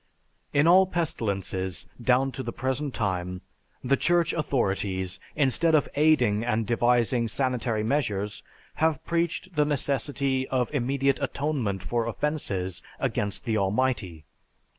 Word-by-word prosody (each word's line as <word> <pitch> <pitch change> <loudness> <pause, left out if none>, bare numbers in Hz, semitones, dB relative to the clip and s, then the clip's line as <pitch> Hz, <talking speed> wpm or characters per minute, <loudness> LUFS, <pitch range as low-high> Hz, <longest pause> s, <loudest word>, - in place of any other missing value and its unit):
In 145 +1 +3
all 185 +3 +6
pestilences 100 - -2 0.2
down 130 +3 +3
to 130 - -5
the 115 - -4
present 130 +4 -2
time, 90 -4 -2 0.4
the 135 +2 +3
Church 170 +3 +2
authorities, 100 - -1 0.2
instead 155 +3 +3
of 150 - +3
aiding 125 -8 +3
and 115 -1 0
devising 120 +1 +2
sanitary 120 -2 -1
measures, 110 -6 -1 0.4
have 160 -1 +1
preached 170 +2 -1
the 150 - +4
necessity 140 -1 -1
of 130 +1 -1
immediate 135 0 +1
atonement 125 -10 -1
for 120 +2 -1
offenses 100 - -2 0.2
against 100 +4 -2
the 110 -3 +1
Almighty. 100 - -1
125 Hz, 120 wpm, -26 LUFS, 105-145 Hz, 0.4 s, all